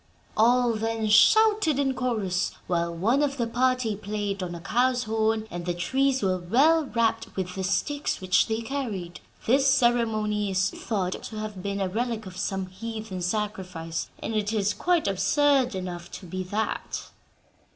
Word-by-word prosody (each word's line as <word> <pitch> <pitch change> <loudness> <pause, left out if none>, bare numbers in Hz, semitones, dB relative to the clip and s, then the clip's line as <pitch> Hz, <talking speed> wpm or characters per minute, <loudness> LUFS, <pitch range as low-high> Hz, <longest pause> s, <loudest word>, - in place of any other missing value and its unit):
"All 240 +2 +4
then 225 0 -1
shouted 415 - +5
in 275 -1 +1
chorus, 210 -8 -1
while 170 -1 0
one 215 - +1
of 280 -1 0
the 235 - 0
party 250 -1 +1
played 205 -1 -3
on 175 -1 -4
a - - -7
cow's 245 +7 +1
horn, 220 -1 0
and 175 0 -5
the 175 - 0
trees 265 +7 +1
were 185 -1 +1
well 290 - +3
rapped 225 -2 0
with 185 -1 -3
the 190 - -4
sticks 285 +10 -1
which 185 0 +3
they 220 0 -1
carried. 220 -10 -4 0.3
This 270 +4 +4
ceremony 225 -5 +2
is 190 +1 +1
thought 190 -5 -3
to 220 - -7
have 215 -3 -5
been 200 +1 -3
a 195 - 0
relic 225 +2 -2
of 185 -1 -9
some 190 0 -2
heathen 215 0 -6
sacrifice, 180 -4 -3
and - - -3
it 210 -1 0
is 210 -2 +1
quite 350 -2 +1
absurd 250 +6 +2
enough 175 -2 -5
to 190 - -8
be 185 +2 -4
that." 210 +4 -3
215 Hz, 165 wpm, -26 LUFS, 185-245 Hz, 0.3 s, shouted